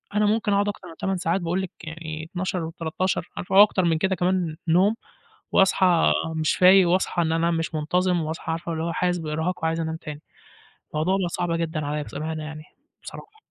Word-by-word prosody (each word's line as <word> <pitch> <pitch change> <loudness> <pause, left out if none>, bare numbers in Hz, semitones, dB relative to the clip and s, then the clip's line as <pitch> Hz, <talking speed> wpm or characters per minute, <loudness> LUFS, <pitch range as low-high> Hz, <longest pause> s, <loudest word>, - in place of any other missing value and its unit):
أنا 210 0 +3
ممكن 210 0 +1
أقعد 200 +1 +2
أكتر 200 -3 -7
من 165 - -11
8 195 -1 -1
ساعات 175 +2 0
باقول 175 +2 -1
لِك 190 - -4
يعني 160 -1 -6
12 185 -1 -2
و13 165 +3 -2
عارفة 180 - -3
وأكتر 200 -1 +6
من 165 -2 +2
كده 190 +2 +1
كمان 180 -2 0
نوم، 190 +6 +4 0.6
وأصحى 185 -3 +4 0.2
مش 155 -1 +1
فايق، 185 0 +6
وأصحى 180 0 +1
إن 160 -1 0
أنا 165 +1 +1
مش 165 -1 -2
منتظِم، 180 +3 +1
وأصحى 160 +1 -4
عارفة 165 +1 -4
اللي 160 0 -3
هو 170 0 -2
حاسس 180 +1 0
بإرهاق 160 +3 -3
وعايز 160 0 0
أنام 160 -1 -2
تاني، 150 -2 -8 0.7
الموضوع 165 +6 +1
بقى 185 -3 -1
صعب 175 0 -2
جدًا 165 -2 -2
عليَّ 150 +1 -2
بصراحة 155 +3 -5
يعني 155 0 -7 0.4
بصراحة. 430 0 -11
170 Hz, 190 wpm, -24 LUFS, 160-185 Hz, 0.7 s, وأكتر